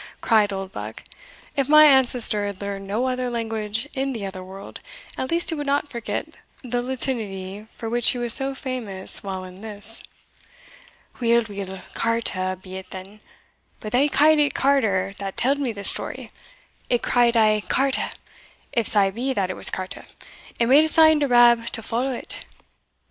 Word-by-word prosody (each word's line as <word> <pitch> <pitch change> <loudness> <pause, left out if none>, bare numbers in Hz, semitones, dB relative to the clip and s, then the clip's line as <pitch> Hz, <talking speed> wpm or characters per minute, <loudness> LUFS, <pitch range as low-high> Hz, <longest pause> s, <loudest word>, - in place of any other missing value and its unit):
cried 215 -3 +2
Oldbuck; 185 - -7 0.5
"if 275 -1 -1
my 305 0 +8
ancestor 250 -7 +2
had 200 -2 -7
learned 200 -1 -6
no 215 +6 -1
other 255 -1 -2
language 225 0 -3
in 270 0 -2
the 220 -4 -5
other 190 -1 -7
world, 190 +1 -11 0.4
at 260 - -4
least 340 +1 0
he 325 - -1
would 290 -1 -5
not 285 +1 -1
forget 235 -2 -5 0.3
the 245 -1 -2
Latinity 215 -6 -3
for 225 - -7
which 240 +1 +3
he - - +2
was 240 -2 +2
so 270 0 +3
famous 235 -9 0
while 190 -1 -5
in 185 +1 -12
this." 215 0 +6 1.2
"Weel, 235 -1 +2
weel, 195 -2 -7
carta 190 -5 -1
be 185 0 -10
it 190 - -10
then, 190 +3 -10 0.6
but 215 - -7
they 275 +5 +2
ca'd 305 +2 +4
it 295 -1 +1
carter 215 -9 +1
that 195 -1 -6
tell'd 275 +3 +1
me 265 -4 -2
the 200 -2 -9
story. - - -1 0.6
It 240 -1 0
cried 240 -1 +2
aye 215 -1 +3
carta, 270 0 +1 0.6
if 235 -5 +1
sae 200 -2 +3
be 250 +6 -3
that 190 -5 -1
it - - -6
was - - -1
carta, 185 0 -7 0.5
and 235 +1 +1
made 290 +3 +7
a - - +1
sign 315 -1 +5
to 290 - +1
Rab 240 -2 +4
to 225 - -5
follow 245 +5 -2
it. 250 - -7
230 Hz, 175 wpm, -22 LUFS, 200-260 Hz, 1.2 s, my